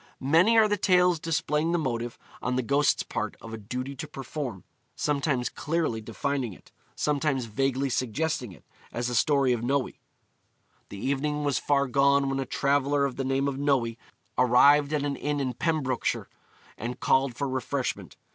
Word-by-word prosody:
Many 165 +12 +4
are 220 -1 +6
the 205 0 0
tales 180 -3 +3
displaying 155 0 0
the - - +3
motive, 120 -6 -3 0.2
on 125 +1 -1
the 130 - 0
ghost's 140 +4 +2
part, 105 0 -4
of 115 - -10
a - - -4
duty 125 +6 -5
to - - -5
perform 135 - -6 0.3
sometimes 140 -4 0
clearly 155 -8 -2
defining 125 +1 -2
it, - - -18 0.2
sometimes 145 -3 0
vaguely 135 +4 0
suggesting 130 -1 -1
it, 85 - -16 0.3
as 120 0 -2
in - - -3
the - - -1
story 135 +1 +3
of 120 - -2
Noe. 135 +2 +1 1.0
'The 100 - -8
evening 145 +6 -1
was 145 -2 +1
far 140 -1 +2
gone 140 +1 +3
when 135 - -1
a 135 - -3
traveller 140 0 +1
of 135 - -3
the 135 - -2
name 135 +1 0
of 135 -1 -3
Noe 135 -5 +1 0.5
arrived 140 +4 +5
at 150 -2 0
an 145 -1 -1
inn 145 0 -2
in 130 -2 -1
Pembrokeshire, 145 -3 -1 0.5
and 120 +3 -4
called 130 -2 +2
for 140 +2 -2
refreshment. 130 0 -3
140 Hz, 175 wpm, -27 LUFS, 125-145 Hz, 1.0 s, are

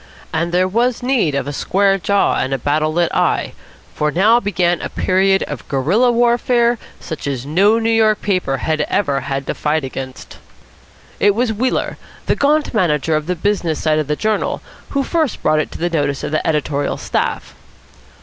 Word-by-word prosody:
And 170 +2 -1
there 180 +1 +2
was 235 +5 0
need 240 - +1
of 140 - -2
a 145 - -4
square 195 +6 +1
jaw 200 +2 +2
and 135 +1 -1
a - - -2
battle 155 +4 0
lit 170 +1 +1
eye, - - 0 0.4
for 150 - 0
now 210 +9 +4
began 175 -5 0
a - - -4
period 190 +1 +2
of - - -7
guerilla 180 - +2
warfare 240 0 +2 0.2
such 160 -3 -6
as 135 -2 -3
no 195 +9 +3
New 230 0 0
York 220 -1 +3
paper 185 -9 -1
had 155 +4 -1
ever 145 -9 +1
had 135 0 -4
to - - -2
fight 150 0 -1
against. 130 0 -7 0.8
It 205 -1 +3
was 235 0 +1
Wheeler, 250 +5 -1 0.3
the - - +1
gaunt 295 +1 +1
manager 160 - +1
of 155 0 -2
the 180 - 0
business 175 -3 -1
side 155 -1 +2
of 155 - -2
the 150 - 0
journal, 215 +5 -1 0.3
who 280 -1 0
first 315 -3 -1
brought 155 - +3
it 155 - -1
to - - -6
the 175 - -1
notice 145 -5 -1
of - - -3
the 155 - -1
editorial 150 -2 -1
staff. - - -2
175 Hz, 190 wpm, -18 LUFS, 150-220 Hz, 0.8 s, now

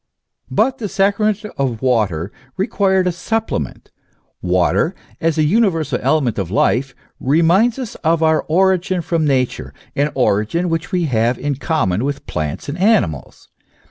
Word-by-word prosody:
But 265 0 +1
the 210 -4 -3
sacrament 205 +2 +1
of 125 -5 -1
water 105 -8 0 0.3
required 190 -2 +1
a 180 - +2
supplement. 180 - -3 0.5
Water, 90 - +1 0.2
as 165 -1 0
a 155 - +3
universal 165 - +1
element 135 -5 +1
of 95 -4 -3
life, 125 +6 +1 0.2
reminds 170 - +3
us 255 -5 -5
of 165 0 +2
our 160 0 +3
origin 185 +1 +2
from 165 -1 0
Nature, 130 -3 -1 0.2
an 145 +1 +1
origin 130 - +1
which 165 +2 -2
we 180 -2 +1
have 120 -4 +1
in 145 0 -2
common 130 - -1
with 140 0 -3
plants 75 +2 -4
and 145 +5 -5
animals. 190 - 0
155 Hz, 140 wpm, -18 LUFS, 120-185 Hz, 0.5 s, a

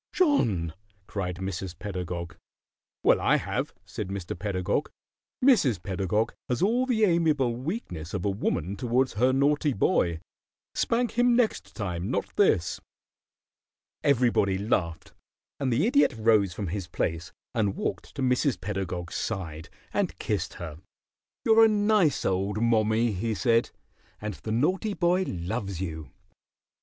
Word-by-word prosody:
"John!" 110 - +2 0.3
cried 90 -4 -3
Mrs. 95 0 -5
Pedagog. 90 -4 -5 0.7
"Well, - - +4
I - - +4
have," - - -2
said 105 - -5
Mr. 95 -2 -4
Pedagog. 95 - -1 0.6
"Mrs. 140 - +4
Pedagog 95 +4 0 0.2
has 125 +6 0
all 245 +6 +2
the 225 -4 +2
amiable 155 - +2
weakness 120 - -5
of 90 - -3
a - - +2
woman 95 -2 -1
towards 125 +4 +1
her 125 +5 +3
naughty 145 +2 +2
boy. 85 -5 +1 0.5
Spank 240 0 0
him 245 0 +5
next 235 -3 0
time, 90 -3 -3
not - - -2
this." 85 - +2 1.2
Everybody 120 -8 +3
laughed, 90 -5 -1 0.5
and 135 -3 0
the 125 - +2
Idiot 250 - +3
rose 110 -4 +3
from 95 0 -4
his 95 0 -4
place 85 +2 -2 0.2
and 105 -5 +1
walked 90 - -4
to 135 - -2
Mrs. 125 - +2
Pedagog's 90 -3 -4
side 80 -7 -4 0.2
and - - 0
kissed - - -2
her. 80 -3 -7 0.7
"You're 225 0 +7
a - - +8
nice 205 -6 +2
old 95 +2 0
mommie," 115 0 +2
he 110 +3 -2
said, 115 +5 +2 0.5
"and 105 0 -4
the 110 - -6
naughty 185 - +1
boy 180 +1 +2
loves 95 +1 -3
you. 80 -5 -5
105 Hz, 135 wpm, -27 LUFS, 90-140 Hz, 1.2 s, a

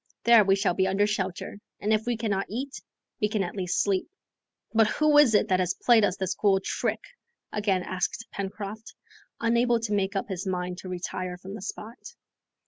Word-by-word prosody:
There 235 -2 +7
we 195 -1 +4
shall 195 -2 +1
be 190 +1 +1
under 195 +2 +2
shelter, 200 -1 -3 0.2
and 210 +2 +1
if 215 +2 0
we 240 -2 0
cannot 205 -4 -1
eat, 265 +7 -5 0.4
we 210 - +2
can 210 -2 0
at 175 - -5
least 180 -3 0
sleep." 195 -2 0 0.7
"But 225 -1 +5
who 305 +5 +2
is 250 -7 +6
it 205 - +3
that 185 -1 +3
has 180 -1 0
played 235 -3 +4
us 190 -2 +1
this 190 -2 -1
cool 195 -2 +2
trick?" - - -2 0.5
again 200 -3 +1
asked 185 +5 -3
Pencroft, 200 +2 -6 0.4
unable 235 +1 +2
to 220 -2 -2
make 200 0 0
up 195 - -1
his 190 -1 -4
mind 180 -1 -3
to 185 - -8
retire 180 0 -4
from 190 +2 -9
the 210 - -7
spot. 220 +4 -8
200 Hz, 195 wpm, -27 LUFS, 190-220 Hz, 0.7 s, There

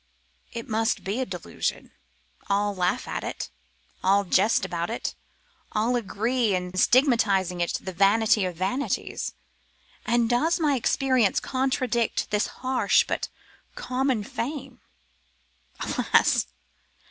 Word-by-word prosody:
It 230 -1 -6
must 225 +1 0
be 200 +6 -2
a 260 - -1
delusion. - - -4 0.6
All 205 +1 +1
laugh 180 -2 0
at - - -3
it, - - -5 0.5
all 200 +2 +4
jest 200 +3 +3
about 170 0 -3
it, 230 - -3 0.6
all 225 +4 +1
agree 230 0 0
in 180 0 -4
stigmatising 200 - +3
it 170 - 0
the 190 - -7
vanity 210 +3 +4
of 180 -2 -3
vanities. 195 - -2 0.7
And 235 -1 +2
does 310 +9 +2
my 300 -3 +2
experience 255 -3 +2
contradict 255 -3 -1
this 210 0 +1
harsh 260 0 +2
but - - -2 0.5
common 260 - -1
fame? 270 +5 -5 1.0
Alas! - - +2
225 Hz, 115 wpm, -26 LUFS, 195-255 Hz, 1.0 s, all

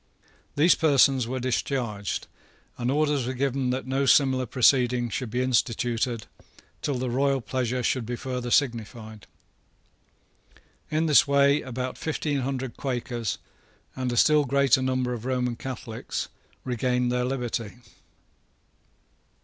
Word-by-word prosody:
These 160 +5 +5
persons 135 -5 +3
were 130 +2 -3
discharged, 120 - -2 0.5
and 120 0 -2
orders 145 -2 +1
were 130 - -3
given 135 0 0
that 130 +1 -2
no 135 +1 0
similar 130 -2 +4
proceeding 125 -1 +3
should 125 +3 -3
be 125 +3 -1
instituted 120 -1 0 0.6
till 140 -3 -1
the 125 +1 -2
royal 135 +2 +2
pleasure 125 +1 -2
should 130 0 0
be 120 +2 -4
further 125 0 -4
signified. 115 -4 -1 1.6
In 155 +1 +1
this 150 -2 +5
way 140 +1 +4
about 130 0 -5
fifteen 150 -2 -2
hundred 130 -1 -3
Quakers, 120 -4 -3 0.6
and 130 -1 -2
a 120 - -2
still 150 +2 +5
greater 140 -1 +3
number 130 -1 0
of 115 -2 -6
Roman 125 -2 -1
Catholics, 115 -3 -5 0.4
regained 125 0 0
their 125 0 0
liberty. 120 -4 -3
130 Hz, 125 wpm, -26 LUFS, 120-135 Hz, 1.6 s, These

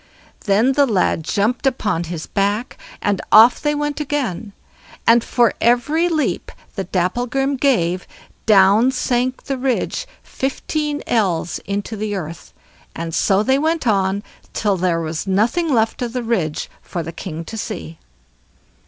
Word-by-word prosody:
Then 215 +5 +3
the 280 +1 +3
lad 185 -6 +1
jumped 220 - 0
upon 210 -10 0
his 165 -1 -5
back, 205 +5 -1 0.3
and 205 -2 +1
off 225 +3 +7
they 295 0 +1
went 295 0 -2
again; 255 - -2 0.5
and 230 0 +5
for 240 -2 +2
every 295 +9 +2
leap 315 -3 -1 0.2
that 190 -3 -5
Dapplegrim 245 +9 0
gave, 185 -10 +1 0.4
down 205 +3 +6
sank 255 0 -1
the 270 -2 -3
ridge 265 - -1 0.2
fifteen 290 +2 -3
ells 185 -7 0
into 200 +3 -3
the 210 0 -3
earth, 165 -3 -7 0.4
and 165 0 -5
so 195 +5 +2
they 265 +3 +2
went 320 0 0
on 200 -2 +1 0.3
till 205 -2 +1
there 175 -2 0
was 160 +2 -4
nothing 235 - +1
left 225 -2 +1
of 240 -1 -3
the 250 -1 -2
ridge 185 -10 -1
for 175 -3 -5
the 165 - -6
king 165 -3 -6
to 225 - -7
see. 195 -7 -6
220 Hz, 145 wpm, -20 LUFS, 190-265 Hz, 0.5 s, off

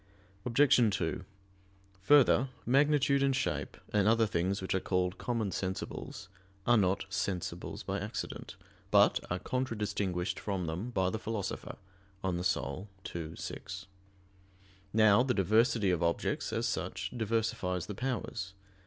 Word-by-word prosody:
Obj. 125 -2 +5
2: 80 +3 -2 0.8
Further, 135 +2 +5 0.2
magnitude 140 +1 +4
and 135 -1 +3
shape, - - -2 0.2
and 105 -1 +3
other 115 0 +5
things 95 0 0
which 95 - -2
are 95 - +2
called 90 0 -1
"common 115 -5 -1
sensibles," 95 0 -4 0.4
are 120 - +5
"not 95 -3 +2
sensibles 100 -2 -3
by - - -2
accident," - - -5 0.3
but - - +5
are 90 - 0
contradistinguished 105 -6 -2
from 95 -4 -2
them 85 +9 -3
by 95 -6 +1
the 110 - -3
Philosopher 105 -3 -4 0.5
(De 95 - +1
Anima 90 -1 -1 0.3
ii, 80 -1 -6
6). - - -6 1.1
Now 110 0 +6
the 125 0 +1
diversity 110 +1 +3
of 90 - 0
objects, 85 0 0
as - - -1
such, 95 +1 -3
diversifies 110 -6 -1
the 105 - -5
powers. 115 -4 -3
100 Hz, 130 wpm, -32 LUFS, 95-115 Hz, 1.1 s, Now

